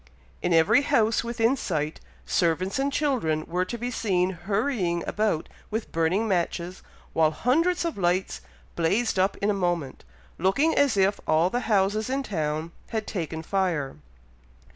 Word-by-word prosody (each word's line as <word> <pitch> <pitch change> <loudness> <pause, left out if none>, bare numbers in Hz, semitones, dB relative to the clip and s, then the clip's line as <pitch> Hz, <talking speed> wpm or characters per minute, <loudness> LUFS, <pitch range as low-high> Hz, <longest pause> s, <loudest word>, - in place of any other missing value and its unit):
In 175 - 0
every 165 - +5
house 230 -7 +2
within 235 +2 +1
sight, 155 - -2 0.3
servants 180 +6 0
and 280 +1 +1
children 235 - 0
were 180 +2 -1
to 235 - -5
be 245 +2 -3
seen 185 -6 +1
hurrying 190 -1 -1
about 210 -7 0 0.2
with 220 +1 -4
burning 165 +7 +1
matches, 175 -1 -1 0.3
while 160 -1 +4
hundreds 330 - +1
of 330 -11 -3
lights 180 +1 0 0.3
blazed 195 +6 +1
up 190 +1 +2
in 205 +1 +1
a - - +1
moment, 175 -8 -2 0.4
looking 235 - +2
as 275 -7 +3
if 195 +1 +3
all 160 +4 +3
the 245 - 0
houses 210 +3 +2
in 270 +1 -1
town 160 - -2 0.2
had 220 -2 -2
taken 160 -4 -4
fire. 170 - -1
190 Hz, 150 wpm, -26 LUFS, 170-230 Hz, 0.4 s, every